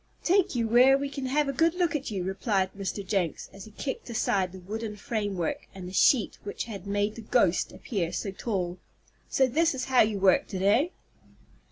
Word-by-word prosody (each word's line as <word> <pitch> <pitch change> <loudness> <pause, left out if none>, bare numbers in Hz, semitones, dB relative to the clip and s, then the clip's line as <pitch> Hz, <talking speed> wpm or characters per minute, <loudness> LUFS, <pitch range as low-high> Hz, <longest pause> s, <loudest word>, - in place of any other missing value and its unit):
"Take 370 -4 +2
you 230 -2 +1
where 250 +4 +6
we 280 0 -3
can 275 -1 -4
have 290 +2 +1
a 275 - -1
good 330 +4 +2
look 350 -3 +1
at 285 -2 -2
you," 195 -4 -3
replied 190 0 -1
Mr. 200 0 -4
Jenks, 185 -4 -2
as 195 0 -10
he 215 - -13
kicked 265 -2 -4
aside 195 -5 0
the 190 - -10
wooden 210 +3 -5
framework, 205 - -3
and 185 -2 -7
the 185 - -9
sheet 230 +3 +3
which 200 - -4
had 200 -4 -8
made 205 +1 0
the 230 - -9
"ghost" 215 -5 +2
appear 180 -8 -3
so 195 +3 -3
tall. 185 -4 -3 0.5
"So 265 - +3
this 315 +4 +1
is 255 - -3
how 260 -1 +4
you 215 -1 +2
worked 190 0 +3
it; 185 - -2
eh?" 225 - +4
215 Hz, 205 wpm, -27 LUFS, 195-265 Hz, 0.5 s, where